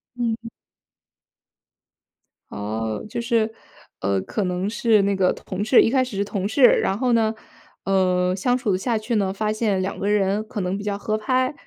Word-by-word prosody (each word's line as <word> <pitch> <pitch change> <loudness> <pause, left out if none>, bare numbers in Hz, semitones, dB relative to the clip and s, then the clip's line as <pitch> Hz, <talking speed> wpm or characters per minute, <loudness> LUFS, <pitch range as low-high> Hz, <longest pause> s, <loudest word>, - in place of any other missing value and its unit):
嗯。 230 -1 -2 2.0
哦， 110 +1 -4
就 - - -4
是， 230 -2 +1 0.5
呃， 95 0 0
可 205 - -3
能 180 +2 -1
是 220 -1 +3
那 200 0 +1
个 185 -1 +2
同 190 +2 -5
事 220 +4 +6
一 - - +3
开 260 0 +3
始 245 -5 -6
是 200 - 0
同 200 -1 -3
事， 255 +6 +1
然 195 -5 +5
后 250 +1 +1
呢， 225 -1 +2 0.5
呃， 185 -1 +2
相 245 +6 +1
处 220 -7 0
下 230 +4 -1
去 220 +2 -2
呢 195 -2 +1
发 215 +2 -1
现 215 -3 0
两 190 - -4
个 200 - -2
人 205 0 +1
可 210 - -4
能 180 +1 -2
比 205 - -6
较 205 -1 -2
合 215 +1 -2
拍， 255 +5 0
205 Hz, 195 characters per minute, -23 LUFS, 190-230 Hz, 2.0 s, 事